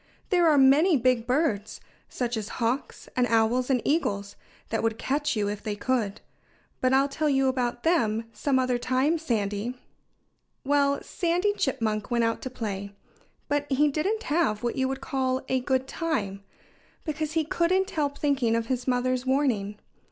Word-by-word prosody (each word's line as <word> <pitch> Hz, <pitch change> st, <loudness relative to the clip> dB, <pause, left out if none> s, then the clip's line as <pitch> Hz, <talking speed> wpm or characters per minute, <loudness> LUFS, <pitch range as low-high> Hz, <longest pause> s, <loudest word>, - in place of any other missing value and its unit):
"There 350 Hz, -3 st, +5 dB
are 300 Hz, -, +4 dB
many 285 Hz, +5 st, +5 dB
big 245 Hz, -2 st, +1 dB
birds 250 Hz, -6 st, 0 dB, 0.3 s
such 245 Hz, -1 st, -2 dB
as 215 Hz, -1 st, -4 dB
hawks 240 Hz, +4 st, -2 dB
and 250 Hz, -1 st, +2 dB
owls 230 Hz, +3 st, +2 dB
and 250 Hz, -4 st, +2 dB
eagles 200 Hz, -10 st, 0 dB, 0.3 s
that 225 Hz, -, -1 dB
would 225 Hz, -1 st, 0 dB
catch 295 Hz, +4 st, -1 dB
you 210 Hz, -2 st, 0 dB
if 205 Hz, 0 st, -4 dB
they 210 Hz, -1 st, -3 dB
could.... 215 Hz, -2 st, -1 dB, 0.6 s
But 255 Hz, -, +2 dB
I'll 270 Hz, +1 st, +4 dB
tell 300 Hz, +2 st, -1 dB
you 270 Hz, -1 st, +3 dB
about 245 Hz, -2 st, -1 dB
them 230 Hz, -10 st, +1 dB
some 275 Hz, -2 st, 0 dB
other 255 Hz, -1 st, +1 dB
time, 260 Hz, +7 st, +1 dB
Sandy." 220 Hz, -4 st, -2 dB, 0.9 s
Well, 280 Hz, 0 st, +2 dB
Sandy 360 Hz, +3 st, 0 dB
Chipmunk 225 Hz, -, -1 dB
went 240 Hz, -1 st, +1 dB
out 230 Hz, 0 st, 0 dB
to 260 Hz, -, -4 dB
play. 200 Hz, -5 st, -5 dB, 0.5 s
But 290 Hz, 0 st, -1 dB
he 295 Hz, +3 st, +4 dB
didn't 390 Hz, +10 st, -1 dB
have 290 Hz, -10 st, 0 dB
what 240 Hz, -, -1 dB
you 260 Hz, -1 st, +1 dB
would 270 Hz, 0 st, -4 dB
call 260 Hz, -1 st, -1 dB
a 260 Hz, -, +1 dB
good 260 Hz, +1 st, 0 dB
time, 205 Hz, -14 st, -2 dB, 0.6 s
because 310 Hz, -1 st, -3 dB
he 325 Hz, -1 st, +2 dB
couldn't 370 Hz, +5 st, +1 dB
help 285 Hz, -2 st, -1 dB
thinking 270 Hz, -6 st, +1 dB
of 230 Hz, 0 st, 0 dB
his 250 Hz, +1 st, -3 dB
mother's 255 Hz, 0 st, 0 dB
warning. 240 Hz, -7 st, +1 dB
260 Hz, 165 wpm, -26 LUFS, 230-290 Hz, 0.9 s, There